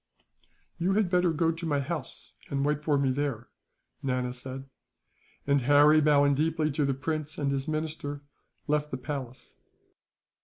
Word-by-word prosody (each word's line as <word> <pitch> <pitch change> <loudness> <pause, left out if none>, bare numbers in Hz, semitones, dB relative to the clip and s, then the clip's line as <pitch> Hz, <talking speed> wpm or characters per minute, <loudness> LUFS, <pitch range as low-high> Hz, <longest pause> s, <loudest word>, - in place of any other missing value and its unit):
"You 180 +3 +1
had 200 -3 +1
better 180 -1 +3
go 165 +1 +2
to 165 +1 -6
my 145 -2 +1
house, 140 0 -5 0.2
and 140 0 0
wait 150 0 0
for 150 -2 +2
me 135 -1 +2
there," 130 -4 -2 0.5
Nana 125 -2 -1
said; 130 +1 -7 0.8
and 140 -1 +3
Harry, 145 +4 +6
bowing 145 -1 +4
deeply 155 +1 +1
to 145 +1 0
the 135 -1 0
prince 155 +2 -3
and 140 -2 0
his 135 -1 -2
minister, 155 -2 -3 0.4
left 150 0 +1
the 130 - -4
palace. 130 -2 -7
145 Hz, 155 wpm, -28 LUFS, 135-155 Hz, 0.8 s, Harry